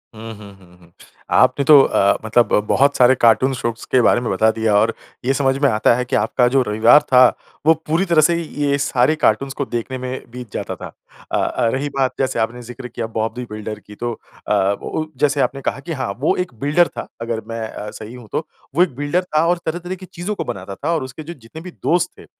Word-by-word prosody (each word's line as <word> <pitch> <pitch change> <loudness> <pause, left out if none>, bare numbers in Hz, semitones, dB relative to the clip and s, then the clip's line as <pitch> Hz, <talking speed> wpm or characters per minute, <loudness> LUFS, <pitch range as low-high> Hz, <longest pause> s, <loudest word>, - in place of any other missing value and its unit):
हुँ, 115 +1 -8
हुँ, 100 -1 -12
हुँ, 90 -2 -20
हुँ। 85 -1 -21 0.5
आपने 130 +2 +4
तो 145 -1 +8
अ, 100 -6 +2
मतलब 115 +2 +3
ब - - +4
बहुत 140 +1 +3
सारे 125 +1 +6
कार्टून 125 +3 +3
शोज़ 115 -2 -4
के 130 - +5
बारे 120 - +3
में 120 - -3
बता 110 +4 +3
दिया 110 -2 0
और 110 +3 +3 0.3
ये 135 - +2
समझ 135 -1 +1
में - - +6
आता 110 +1 +3
है 125 +1 -2
कि - - -2
आपका 120 +4 +2
जो 135 +2 +3
रविवार 110 +7 +5
था, 130 -3 +6 0.4
वो 160 - +7
पूरी 165 +5 +1
तरह 170 -3 +4
से 170 +3 +3
ये 145 -3 -1
सारे 135 +1 +2
कार्टून्स 135 -1 +1
को 140 - -3
देखने 120 +2 -4
में 130 +1 -5
बीत 125 -3 -9
जाता - - -4
था। - - -8 0.4
अ, - - +1
अ, - - 0
रही 140 +2 -2
बात 130 -2 +1
जैसे 130 -1 0
आपने 115 +2 -2
ज़िक्र 125 +1 -9
किया 115 -1 -5
बॉब 110 0 -2
दी 125 0 -5
बिल्डर 105 0 -6
की, 105 0 -14
तो 120 +3 -3 0.4
अ, - - -2 0.3
ओ - - -4
ओ 155 - -3
जैसे 145 0 +2
आपने 135 +1 -1
कहा 130 - -2
कि 145 +5 -8
हाँ, 130 -7 -3
वो 145 - +2
एक 180 -7 -3
बिल्डर 150 +6 +3
था - - -5
अगर 115 -1 -3
मैं 115 0 -5
अ, 105 - -7
सही 110 +3 -9
हूँ 125 -3 -11
तो। - - -3 0.3
वो 175 - +6
एक 165 -9 -3
बिल्डर 145 +6 0
था 155 -2 +1
और 175 +1 +2
तरह-तरह 175 +3 -3
की 185 0 -11
चीज़ों 180 +5 -5
को - - -3
बनाता 95 +1 -6
था 160 +9 -2
और 160 - -1
उसके 130 +4 -8
जो 170 +3 -7
जितने 135 +2 -12
भी 180 +2 -9
दोस्त 175 0 +2
थे, - - -13
130 Hz, 245 wpm, -19 LUFS, 115-145 Hz, 0.5 s, तो